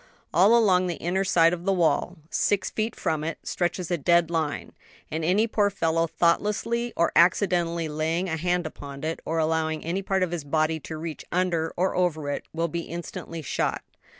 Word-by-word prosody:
All 200 +8 +6
along 185 -5 +4
the 175 - -2
inner 185 +3 0
side 170 -3 +4
of 175 -1 -4
the 195 - +1
wall, 180 0 +1
six 205 -2 +1
feet 220 +1 -2
from 155 -2 -1
it, 165 +1 -3
stretches 175 0 -2
a 175 - +1
dead 170 +2 +3
line; 160 -3 -2 0.4
and 160 +1 -2
any 190 +7 +3
poor 210 -2 +2
fellow 165 -3 0
thoughtlessly 210 +8 0
or 170 - +3
accidentally 170 -2 +3
laying 160 +4 -1
a 160 - -1
hand 175 +1 0
upon 140 -2 -8
it, 160 +1 -2
or 165 - -2
allowing 160 -1 0
any 175 +4 -1
part 190 -1 0
of 180 - -1
his 170 -4 -3
body 155 +2 0
to 155 +1 -7
reach 160 0 -6
under 170 -2 0
or 185 +2 +1
over 160 -5 0
it, - - -4
will 165 +1 -1
be 170 +1 -3
instantly 165 -1 -7
shot. - - -1
170 Hz, 190 wpm, -26 LUFS, 160-185 Hz, 0.4 s, All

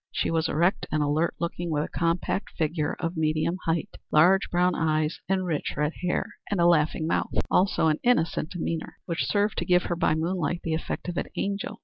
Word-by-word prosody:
She - - -1
was 165 -1 +1
erect 170 +6 +1
and 150 0 +1
alert 150 +3 +1
looking, 170 0 -3
with 150 -2 0
a - - -4
compact 170 +4 -1
figure 155 -1 0
of 165 0 -2
medium 155 +2 0
height, 165 -1 -1
large 180 +5 +5
brown 180 +1 +2
eyes 155 0 0
and 190 -1 +1
rich 160 -4 -2
red 150 +2 0
hair, 180 -1 -2
and 200 - -1
a 170 - +4
laughing 155 -2 +3
mouth; 165 - 0 0.2
also 190 -2 +3
an 155 -1 +2
innocent 165 -10 +1
demeanor, 165 -2 -4
which 170 -1 -2
served 205 0 +1
to - - -2
give 180 0 +4
her, 175 - -2
by 155 - +2
moonlight, 170 0 -1
the 165 - -1
effect 160 - -3
of 175 - -4
an - - -1
angel. 200 0 -3
165 Hz, 205 wpm, -26 LUFS, 155-180 Hz, 0.2 s, large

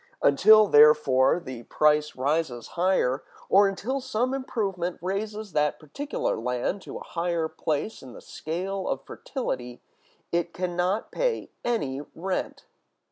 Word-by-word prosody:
Until, 215 +9 +7
therefore, 145 -4 +5
the 130 -8 -8
price 150 +3 +2
rises 135 -3 -1
higher, 175 -7 +1 0.3
or 200 +1 +6
until 240 +8 -2
some 255 0 -1
improvement 195 -10 -2
raises 210 +3 -4
that 150 -2 +1
particular 220 - -3
land 125 - -2
to - - -8
a - - -8
higher 170 -1 -1
place 160 +6 -3
in 130 -2 -11
the - - -10
scale 185 +4 -4
of - - -3
fertility, 125 - -5 0.5
it 170 0 -1
can 180 -1 -2
not 185 +5 0
pay - - -1
any 145 - -1
rent. 185 +3 -3
175 Hz, 135 wpm, -26 LUFS, 145-205 Hz, 0.5 s, Until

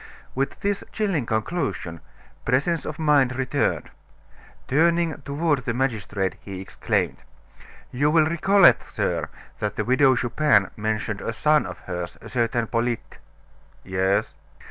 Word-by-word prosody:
With 135 +1 -2
this 200 0 -1
chilling 190 - -1
conclusion, 110 - -2 0.4
presence 150 +7 +1
of - - -5
mind 145 -5 +3
returned. 130 -1 -1 0.8
Turning 165 +2 +2
toward 145 +1 0
the 115 - -1
magistrate, 105 -7 -1
he 95 -2 -7
exclaimed: 95 - -1 0.7
"You 145 +4 +2
will 155 0 +4
recollect, 195 +5 +5
sir, - - -1 0.3
that - - -2
the - - -2
Widow 130 +1 +4
Chupin 120 -4 +2
mentioned 110 -1 -2
a - - -2
son 150 +6 +2
of - - -7
hers, 90 -1 -5
a - - -11
certain 120 -1 0
Polyte 115 0 -2 0.4
" - - -30 0.2
"Yes." 95 +3 0
130 Hz, 130 wpm, -24 LUFS, 110-155 Hz, 0.8 s, recollect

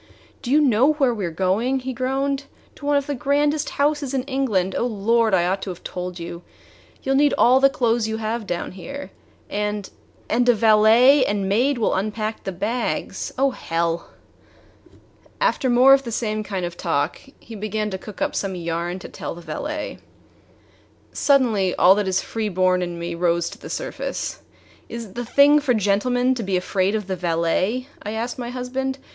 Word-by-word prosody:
"Do 240 - -6
you 290 +4 +5
know 270 +1 +4
where 270 -5 +2
we 210 -3 -4
are - - -3
going?" 195 +10 0
he 260 +1 -4
groaned. 270 +2 -1 0.3
"To 285 - -9
one 290 0 +3
of 280 - -1
the 290 - -2
grandest 290 +2 +1
houses 285 -2 +1
in 260 - 0
England! 245 -9 0
Oh, 240 - 0
Lord! 225 0 +2
I 175 -1 +2
ought 190 +2 -1
to 195 - -5
have 180 -1 -8
told 180 0 -5
you. 170 0 -7 0.6
You 270 - 0
'll - - +2
need 290 0 +4
all 255 +2 +5
the 275 0 +6
clothes 235 -4 +1
you 220 0 -2
have 220 0 -3
down 175 -2 -3
here. 275 +10 -8 0.4
And 210 -1 -3 0.4
and 245 +2 +2
a 240 - +6
valet 225 +5 +6
and 200 -1 -1
maid 245 +8 +2
will 225 - +1
unpack 215 +3 -3
the 195 - -2
bags 210 +7 -3
oh, 270 +1 +3
hell!" 170 -5 -2 1.3
After - - +1
more 250 +3 +7
of 275 - +5
the 240 -3 -6
same 215 -1 -2
kind 190 -4 -3
of 175 0 -6
talk, 145 -5 -1 0.2
he 230 - -12
began 215 0 -3
to 190 - -4
cook 205 0 -6
up - - -1
some 195 -2 -2
yarn 170 +1 -3
to 185 - -9
tell - - -6
the 175 - -10
valet. 300 - -5 1.1
Suddenly 230 -10 +2
all 180 +2 +6
that 205 0 -1
is 190 0 0
free 220 -2 -3
born 185 -1 +2
in 175 -1 -4
me 170 0 -4
rose 170 0 0
to - - -11
the - - -9
surface. - - -4 0.5
"Is 235 0 -6
it 195 - -14
the 245 - -4
thing 285 +5 +5
for 275 -4 +1
gentlemen 245 +5 +2
to 250 - -4
be 190 -3 0
afraid 190 +2 0
of 210 -2 -2
the 190 0 -3
valet?" 180 +7 0 0.2
I 210 - -5
asked 235 +3 -4
my 240 -1 -4
husband. 260 +2 -3
220 Hz, 195 wpm, -22 LUFS, 190-260 Hz, 1.3 s, more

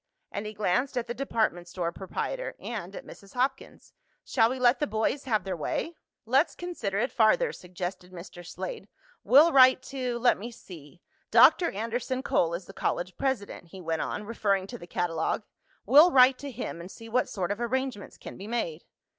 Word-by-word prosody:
and 205 +1 -4
he 215 - -6
glanced 210 +7 0
at 240 - 0
the 240 - -4
department 220 -9 -1
store 175 -1 -3
proprietor - - -4
and - - -6
at - - -8
Mrs. 200 +2 -14
Hopkins. 265 +2 -3 0.3
"Shall 225 -3 +3
we 260 - -3
let 250 0 +3
the 295 - 0
boys 220 +6 -1
have 220 -5 +1
their 190 -2 -3
way?" 320 - -3 0.3
"Let's 265 +8 +2
consider 285 - -4
it 240 +5 0
farther," 460 - +3
suggested 180 0 -7
Mr. 175 0 -10
Slade. 460 - -7 0.4
"We'll 295 +7 +6
write 260 -2 +6
to 255 -3 -3
let 240 -3 +3
me 230 +4 -6
see 175 -7 -13 0.3
Dr. 345 - +6
Anderson 235 +5 -3
Cole 170 -9 +1
is 175 +1 -7
the - - -12
college 180 0 -2
president," 255 -9 -3
he 190 +3 -11
went 165 -2 -2
on, - - -3
referring 200 -3 0
to 240 +4 -9
the 175 - -11
catalogue. 170 +2 -1 0.4
"We'll 295 - +8
write 255 -3 +6
to 285 - -6
him 235 -8 -6
and 175 - -9
see 225 +3 -11
what 250 +3 0
sort 185 -2 -2
of 205 +3 -3
arrangements 255 -3 -3
can - - -10
be 195 - -8
made." 180 -9 -3
225 Hz, 190 wpm, -28 LUFS, 185-260 Hz, 0.4 s, We'll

